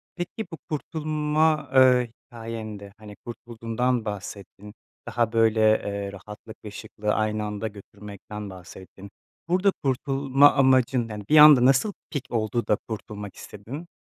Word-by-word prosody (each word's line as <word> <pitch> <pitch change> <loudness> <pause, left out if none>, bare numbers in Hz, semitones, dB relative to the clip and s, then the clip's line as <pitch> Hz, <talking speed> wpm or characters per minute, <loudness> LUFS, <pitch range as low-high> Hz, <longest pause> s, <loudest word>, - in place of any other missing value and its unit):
Peki, 185 +5 -5
bu 165 - -7
kurtulma, 155 -1 0
eee, 125 -2 +5 0.2
hikâyen 115 -2 -7
de, 100 0 -12
hani, 105 -1 -12
kurtulduğundan 120 +1 -3
bahsettin. 100 0 -8 0.3
Daha, 115 -2 0
böyle, 115 -1 +3 0.3
eee, 100 -1 -4
rahatlık 105 +2 -11
ve 105 - -7
şıklığı 105 0 -4
aynı 110 0 -1
anda 105 +1 -4
götürmekten 105 0 -10
bahsettin. 95 +2 -12 0.4
Burada 185 +3 +3
kurtulma 135 +1 +3
amacın, 130 -3 +3
yani, 105 -1 -7
bir 155 - +5
anda 150 -4 +9
nasıl 135 +11 +3 0.2
pik 145 -5 -4
oldu 115 +1 -1
da - - +3
kurtulmak 105 -2 -7
istedin? 135 - -9
115 Hz, 135 wpm, -25 LUFS, 105-135 Hz, 0.4 s, anda